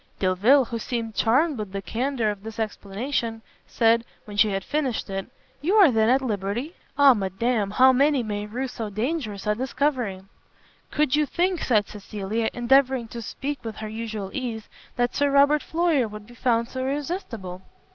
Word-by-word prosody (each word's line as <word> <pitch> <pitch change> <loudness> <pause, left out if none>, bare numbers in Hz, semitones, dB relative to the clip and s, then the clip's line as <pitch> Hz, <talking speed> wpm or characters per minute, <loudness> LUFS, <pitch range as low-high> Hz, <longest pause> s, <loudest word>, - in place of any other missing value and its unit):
Delvile, 210 +9 +4
who 230 0 -4
seemed 230 -1 -3
charmed 265 +6 +2
with 205 -2 -5
the 200 - -2
candour 240 0 -1
of 205 -1 -8
this 220 +1 -8
explanation, 225 +2 -3 0.2
said, 230 0 +3 0.2
when 210 - -9
she 210 +1 +4
had 195 -1 -2
finished 280 -4 -1
it, 195 0 -3 0.3
"You 355 +8 +1
are 390 -9 +7
then 220 -1 +3
at 265 +2 +3
liberty? 220 - -2 0.2
Ah 285 -2 +8
madam! 205 +1 -1
how 260 +5 +5
many 275 0 +3
may 210 -1 -4
rue 250 +5 -3
so 225 -3 -5
dangerous 215 -1 -3
a 210 - +2
discovery!" 255 -4 -1 0.7
"Could 295 -2 +1
you 300 -1 +2
think," 355 +1 0
said 215 -5 +2
Cecilia, 210 +2 -3
endeavouring 255 -1 +2
to 235 - -6
speak 280 +5 -5
with 225 -2 -5
her 215 - -6
usual 220 -3 -5
ease, 235 -5 -4 0.3
"that 245 0 0
Sir 285 0 +2
Robert 285 +2 +4
Floyer 320 -7 +1
would 210 0 -9
be 240 - -15
found 235 -1 +1
so 260 - -6
irresistible?" 260 - -4
235 Hz, 175 wpm, -25 LUFS, 210-275 Hz, 0.7 s, Ah